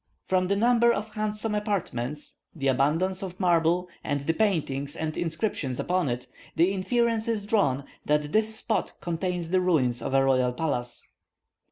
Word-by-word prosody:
From 185 Hz, -1 st, +1 dB
the 200 Hz, -, +2 dB
number 235 Hz, +2 st, +4 dB
of 215 Hz, -1 st, -3 dB
handsome 215 Hz, 0 st, -1 dB
apartments, 155 Hz, -, -2 dB, 0.2 s
the 140 Hz, -4 st, 0 dB
abundance 160 Hz, +9 st, +1 dB
of 185 Hz, -2 st, -6 dB
marble, 175 Hz, -1 st, +2 dB, 0.2 s
and 145 Hz, -1 st, -1 dB
the 165 Hz, +4 st, 0 dB
paintings 150 Hz, -8 st, 0 dB
and 155 Hz, -1 st, -3 dB
inscriptions 155 Hz, -, -2 dB
upon 180 Hz, -5 st, 0 dB
it, 120 Hz, +1 st, -3 dB, 0.3 s
the 175 Hz, +3 st, +4 dB
inference 230 Hz, +3 st, +1 dB
is 220 Hz, -3 st, -1 dB
drawn 195 Hz, -, +2 dB, 0.2 s
that 150 Hz, 0 st, +1 dB
this 220 Hz, 0 st, +2 dB
spot 220 Hz, 0 st, -1 dB
contains 175 Hz, 0 st, -2 dB
the 185 Hz, 0 st, +3 dB
ruins 135 Hz, -10 st, +2 dB
of 135 Hz, -, -2 dB
a 135 Hz, 0 st, +4 dB
royal 130 Hz, -2 st, +2 dB
palace. 125 Hz, -4 st, -3 dB
175 Hz, 160 wpm, -27 LUFS, 140-210 Hz, 0.3 s, number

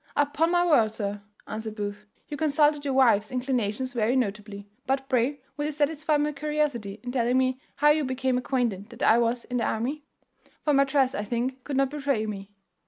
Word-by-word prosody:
"Upon 290 Hz, +3 st, +2 dB
my 350 Hz, 0 st, +3 dB
word, 235 Hz, -11 st, +4 dB
sir," 205 Hz, -2 st, -4 dB, 0.2 s
answered 220 Hz, 0 st, -6 dB
Booth, 205 Hz, 0 st, -5 dB, 0.2 s
"you 295 Hz, -, -5 dB
consulted 295 Hz, 0 st, +2 dB
your 275 Hz, -2 st, -1 dB
wife's 225 Hz, -6 st, +4 dB
inclinations 250 Hz, -1 st, -1 dB
very 235 Hz, +1 st, +1 dB
notably; 205 Hz, -4 st, -3 dB, 0.2 s
but 270 Hz, 0 st, 0 dB
pray 260 Hz, +2 st, 0 dB
will 295 Hz, +1 st, -2 dB
you 305 Hz, -, -1 dB
satisfy 300 Hz, +1 st, +1 dB
my 295 Hz, +1 st, 0 dB
curiosity 285 Hz, -8 st, -2 dB
in 245 Hz, -, -4 dB
telling 245 Hz, 0 st, +1 dB
me 260 Hz, 0 st, +1 dB, 0.2 s
how 295 Hz, +1 st, +4 dB
you 305 Hz, 0 st, +2 dB
became 260 Hz, -1 st, -1 dB
acquainted 235 Hz, -6 st, -1 dB
that -, -, -7 dB
I 230 Hz, -, +5 dB
was 235 Hz, +1 st, 0 dB
in 250 Hz, -, -3 dB
the 235 Hz, -, 0 dB
army? 255 Hz, +7 st, -2 dB, 0.6 s
for 300 Hz, -, +2 dB
my 275 Hz, 0 st, +5 dB
dress 270 Hz, -1 st, +2 dB
I 210 Hz, -, -2 dB
think 250 Hz, +4 st, -3 dB
could 280 Hz, -2 st, -3 dB
not 275 Hz, -1 st, +2 dB
betray 275 Hz, -7 st, -1 dB
me." 200 Hz, -2 st, -6 dB
260 Hz, 195 wpm, -26 LUFS, 220-290 Hz, 0.6 s, I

